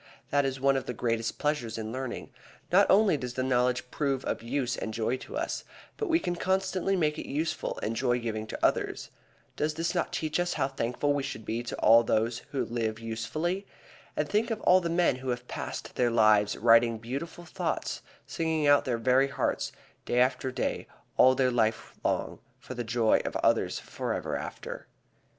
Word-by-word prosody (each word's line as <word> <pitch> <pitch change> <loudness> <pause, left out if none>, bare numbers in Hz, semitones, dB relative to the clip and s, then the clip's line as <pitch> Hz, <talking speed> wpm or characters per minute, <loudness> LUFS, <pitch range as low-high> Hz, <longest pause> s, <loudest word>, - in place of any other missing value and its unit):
That 145 0 +3
is 135 0 -2
one 135 0 +3
of 135 - -4
the 125 - -3
greatest 115 0 -1
pleasures 145 -7 -1
in 110 0 -4
learning. 130 0 -5 0.4
Not 195 +3 +5
only 195 -5 +5
does 125 -2 -5
the 130 - 0
knowledge 125 -1 +1
prove 135 -3 -1
of - - -2
use 125 +1 -1
and 110 - -5
joy 115 +2 0
to - - -7
us, - - -2 0.3
but 440 - -2
we 330 0 +4
can 175 - -2
constantly 190 +1 0
make 155 -4 +1
it - - -7
useful 155 +3 -2
and 115 - -1
joy 125 0 +1
giving 110 -2 -3
to - - -1
others. - - 0 0.4
Does 150 +1 -1
this 165 +2 -1
not 175 - -1
teach 155 +1 -1
us 175 0 0
how 135 -3 0
thankful 135 +2 0
we 145 - 0
should 110 -5 -6
be 115 +2 -2
to 120 - -5
all 115 +2 +7
those 115 +1 +1
who 135 - -1
live 115 -2 -2
usefully? 155 - -3 0.5
And - - +1
think 220 +3 +1
of 225 -2 -2
all 185 +1 +5
the 170 - -2
men 170 -6 +2
who 130 0 -5
have 125 0 -3
passed - - -5
their 125 -1 +2
lives 110 -2 +4
writing 115 0 +5
beautiful 140 +10 -6
thoughts, 160 - -3 0.2
singing 160 -2 -1
out 145 0 +7
of - - -9
their 125 -2 0
very 130 +3 +3
hearts, 140 - -1 0.3
day 120 - +1
after 130 +1 +2
day, - - -2 0.3
all 130 0 +6
their 130 -1 +2
life 110 -2 0
long, - - -1 0.2
for - - -9
the 120 -1 -3
joy 115 -1 +2
of - - -4
others - - +2
forever - - -3
after. - - -6
130 Hz, 195 wpm, -29 LUFS, 115-155 Hz, 0.5 s, all